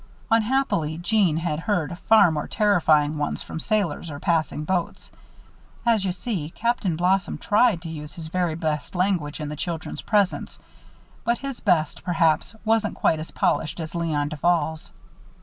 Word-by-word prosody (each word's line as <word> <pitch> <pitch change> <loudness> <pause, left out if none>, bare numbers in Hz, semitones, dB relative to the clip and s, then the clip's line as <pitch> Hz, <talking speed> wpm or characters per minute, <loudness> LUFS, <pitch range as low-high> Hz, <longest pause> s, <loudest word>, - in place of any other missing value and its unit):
Unhappily 225 - +1
Jeanne 175 -2 +2
had 160 -2 -1
heard 175 -3 -1
far 220 -6 +7
more 150 -1 -3
terrifying 155 -7 +3
ones 145 - -2
from - - -6
sailors 185 -5 -1
on 145 -2 -6
passing 155 -3 0
boats. 175 +2 -2 0.7
As 230 -4 +3
you 185 - +1
see, 180 -4 -4
Captain 215 -3 -1
Blossom 185 +3 +1
tried 210 -4 +2
to 165 - -6
use 150 -1 -8
his 165 -2 -7
very 175 -1 -1
best 155 0 -3
language 180 -5 0
in 150 -1 -4
the 150 - -5
children's 165 +1 -4
presence; 205 -3 0 0.7
but 235 0 +1
his 275 -2 -6
best, 165 -7 +1
perhaps, 165 +3 +1
wasn't 220 -1 +1
quite 160 - +2
as 155 - -6
polished 155 +2 0
as 160 -2 -5
Léon 155 -4 -1
Duval's. 160 +1 0
170 Hz, 155 wpm, -24 LUFS, 155-205 Hz, 0.7 s, far